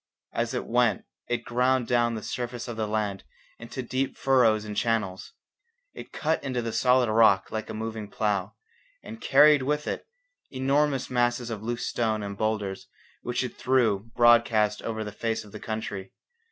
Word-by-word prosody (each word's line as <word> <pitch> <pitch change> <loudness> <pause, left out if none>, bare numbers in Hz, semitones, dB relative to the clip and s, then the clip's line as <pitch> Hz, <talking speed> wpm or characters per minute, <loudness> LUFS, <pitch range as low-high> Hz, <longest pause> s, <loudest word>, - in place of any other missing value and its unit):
As - - -1
it - - -2
went - - +1 0.2
it 120 -1 -1
ground 125 +1 +2
down 120 -1 +1
the 110 - -6
surface 120 -1 -4
of 120 - -5
the 110 -1 -2
land 105 -2 -2 0.4
into 120 +3 -6
deep 130 +2 -2
furrows 115 -5 +3
and 105 -1 -6
channels; 105 -6 -1 0.6
it - - -10
cut 160 +1 -1
into 130 -3 -2
the 115 -1 -3
solid 125 -1 +3
rock 110 -4 +4
like 110 0 -4
a - - -4
moving 110 -1 -5
plough, 100 -3 -1 0.5
and 225 - -9
carried 150 -1 +6
with 150 +3 -1
it - - -4 0.4
enormous 135 0 0
masses 120 -1 0
of 110 -3 -5
loose 120 +2 -3
stone 110 -3 -1
and 100 0 -5
boulders 105 -2 -2 0.3
which 120 +1 -2
it 125 - -5
threw 115 -5 +1
broadcast 115 -3 +4
over 110 -1 -3
the 105 - -6
face 110 +2 -2
of 105 - -15
the 105 - -8
country. 105 -3 -5
115 Hz, 170 wpm, -27 LUFS, 110-125 Hz, 0.6 s, carried